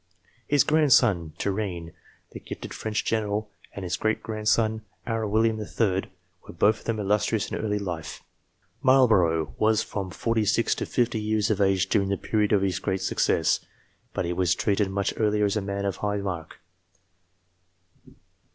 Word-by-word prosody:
His 145 -2 +4
grandson, 120 - +3
Turenne, 95 -5 -3 0.4
the - - -8
gifted - - -8
French 110 -1 -3
general, 105 -1 -1 0.2
and 100 - -7
his 90 - -2
great 110 0 -1
grandson, 110 0 0 0.2
our 115 -2 -1
William 110 +1 +2
III., 100 -3 0 0.4
were - - -10
both 105 +4 +3
of - - -19
them 115 -2 -1
illustrious 105 +1 0
in - - -2
early 105 -1 -1
life. 90 -5 -5 0.6
Marlborough 90 - +4
was 110 0 +3
from 100 -2 -4
46 115 +2 +1
to - - -4
50 120 -2 0
years 110 0 +1
of 105 -1 0
age 95 -1 +2
during 100 -2 +1
the 100 - 0
period 105 +1 0
of 100 -2 +3
his 95 -2 0
greatest 95 0 -1
success, - - +2 0.5
but - - -2
he 85 - -1
was 90 0 +1
treated 100 0 +1
much 100 +1 -1
earlier 105 -1 +2
as 100 - 0
a 105 - 0
man 100 0 -3
of 100 -2 -2
high 105 0 -1
mark. 90 -5 -5
105 Hz, 160 wpm, -26 LUFS, 95-110 Hz, 0.6 s, His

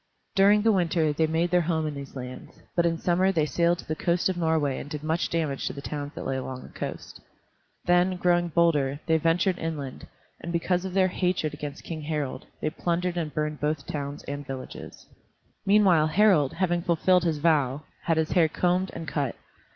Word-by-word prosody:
During 205 +1 +5
the 225 - +5
winter 165 -5 +2
they 160 +2 +2
made 165 +2 0
their 180 0 +4
home 160 -1 0
in 150 - -2
these 140 -1 -8
lands, 125 -1 -9
but 170 -1 +3
in 165 -1 0
summer 185 +3 +2
they 160 -5 +1
sailed 170 +3 +2
to - - -11
the 155 - -1
coast 175 +3 +1
of 185 - -1
Norway 160 -5 +1
and 145 - -8
did 150 0 -5
much 160 +2 0
damage 155 -5 -1
to - - -3
the 140 - -8
towns 145 -1 -4
that - - -6
lay 135 - -1
along 130 0 -5
the - - -12
coast. - - -7 0.6
Then, 180 +1 +3
growing 175 -1 +2
bolder, 150 -5 +2
they 160 -1 +3
ventured 175 +3 +2
inland, 150 -5 -5 0.3
and 170 - -6
because 175 +2 0
of 190 -1 -5
their 185 -1 +4
hatred 180 -4 -1
against 145 -1 -7
King 160 -2 -5
Harald, 150 -3 -3 0.2
they 155 - 0
plundered 175 +1 -1
and 165 -3 -2
burned 150 0 -2
both 150 -1 -1
towns 145 -1 -5
and 145 0 -5
villages. 135 -2 -8 0.6
Meanwhile 190 -6 +5
Harald, 165 -5 +4
having 175 -1 0
fulfilled 180 +1 +3
his 165 -3 0
vow, 145 -3 +2 0.2
had 165 -2 +2
his 160 0 0
hair 170 -3 +4
combed 180 +3 +1
and 165 -1 -6
cut. 140 -5 -2
165 Hz, 200 wpm, -26 LUFS, 150-175 Hz, 0.6 s, During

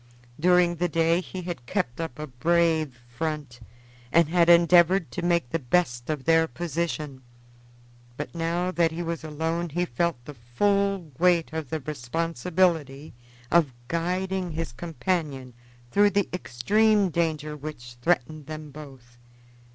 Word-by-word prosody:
During 175 0 +4
the 175 +1 0
day 165 +2 +2
he 185 0 -7
had 170 -9 -6
kept 120 +5 -2
up 160 -7 -5
a 150 - -5
brave 155 0 +1
front 145 -1 -4 0.5
and 170 -2 +4
had 170 0 +3
endeavored 175 -1 +5
to - - -4
make 170 -7 +1
the 165 - 0
best 125 -3 0
of 150 -4 -2
their 165 0 +4
position, 155 -2 -4 1.0
but 150 - -5
now 170 +2 -1
that 170 -2 +2
he 170 +2 -4
was 165 -1 -4
alone 160 +2 -2
he 175 +4 -1
felt 170 +3 -1
the 150 - -8
full 195 - 0
weight 170 -3 +3
of 160 -4 -4
the 160 - -2
responsibility 155 +1 -1 0.4
of 160 -6 +4 0.2
guiding 180 +1 -1
his 165 -3 -3
companion 150 -3 -3 0.4
through 205 0 +5
the 200 -1 +1
extreme 205 - +2
danger 155 -3 -1
which 140 -5 -8
threatened 155 -1 0
them 155 -1 -7
both. 135 -5 -13
165 Hz, 140 wpm, -26 LUFS, 145-175 Hz, 1.0 s, endeavored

